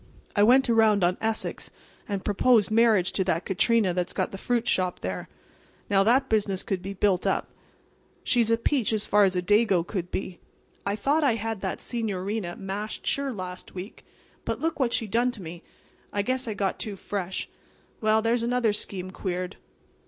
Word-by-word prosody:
I 205 - +3
went 255 +6 +6
around 220 -4 +4
on 175 +1 +3
Essex 225 0 -2 0.4
and 200 -2 -3
proposed 215 0 +3
marriage 220 -5 +4
to 190 - 0
that 170 -2 0
Catrina 205 0 +2
that's 180 0 -2
got - - -1
the 195 - -6
fruit 240 +1 0
shop 180 -1 +1
there. 90 0 -4 0.6
Now, 195 -1 +5
that 255 +5 +3
business 200 -4 +1
could 190 -2 -2
be 195 +2 -5
built 190 -2 +1
up. - - 0 0.7
She's 235 -3 +2
a 230 - +4
peach 235 -1 +1
as 215 -1 0
far 205 0 +5
as 190 -1 0
a 180 - 0
Dago 205 -3 +3
could 180 -3 -4
be. 185 -1 -4 0.5
I 200 - +1
thought 285 +9 +1
I 260 -6 +3
had 225 -2 -4
that 190 - -3
senoreena 205 -4 -3
mashed 200 +3 -5
sure 280 -1 0
last 185 -5 -7
week. 185 +4 -8 0.4
But - - -3
look 325 -1 -2
what 250 -4 +2
she 225 - -1
done 235 +4 +1
to 240 -5 -7
me! 170 +1 -8 0.5
I 205 - 0
guess 255 +3 -1
I 215 - -3
got 195 -1 -1
too 210 -2 -4
fresh. 190 -1 -4 0.5
Well 215 0 +3
there's 230 +1 +2
another 235 -2 +1
scheme 185 -3 -5
queered." 180 0 -4
205 Hz, 185 wpm, -26 LUFS, 185-230 Hz, 0.7 s, went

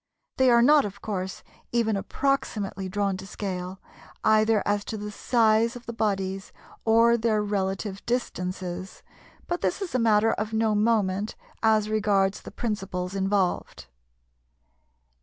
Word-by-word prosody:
They 260 -1 +5
are 235 -1 +6
not, 295 +3 +6
of 200 -1 -6
course, 190 -3 -4 0.3
even 230 -3 +1
approximately 200 -4 -2
drawn 200 -1 -1
to 190 - -9
scale 185 -2 -5 0.4
either 215 -1 +4
as 205 0 +1
to 220 - -4
the 210 0 -6
size 230 +1 +2
of 245 0 -10
the 235 - -5
bodies 195 -3 -2 0.3
or 230 +1 +5
their 220 -2 +1
relative 195 0 -2
distances, 185 -6 -3 0.4
but 350 0 -3
this - - 0
is 390 -4 -5
a 255 - +2
matter 225 -1 +4
of 215 +1 -3
no 220 -1 +2
moment 210 -2 +1 0.3
as 220 -1 +3
regards 205 -2 +1
the - - -9
principles 195 -5 -3
involved. 195 -1 -1
210 Hz, 140 wpm, -26 LUFS, 195-225 Hz, 0.4 s, are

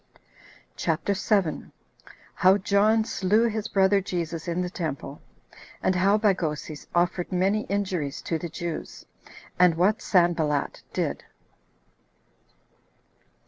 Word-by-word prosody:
CHAPTER 165 +5 0
7. 195 -5 0 0.6
How 190 +2 +4
John 210 +3 +2
Slew 210 +3 +2
His 220 -1 -3
Brother 195 0 +3
Jesus 170 -3 -4
In 175 +1 -1
The 180 - -3
Temple; 160 -8 -5 0.6
And 185 - +2
How 195 +3 +3
Bagoses 165 -8 -1
Offered 175 +1 0
Many 195 +4 +1
Injuries 185 -8 -2
To 165 - -2
The 170 - -5
Jews; 170 0 -6 0.5
And 180 -2 +5
What 190 +6 +2
Sanballat 165 -6 +1
Did. - - -2
180 Hz, 105 wpm, -26 LUFS, 170-200 Hz, 0.6 s, And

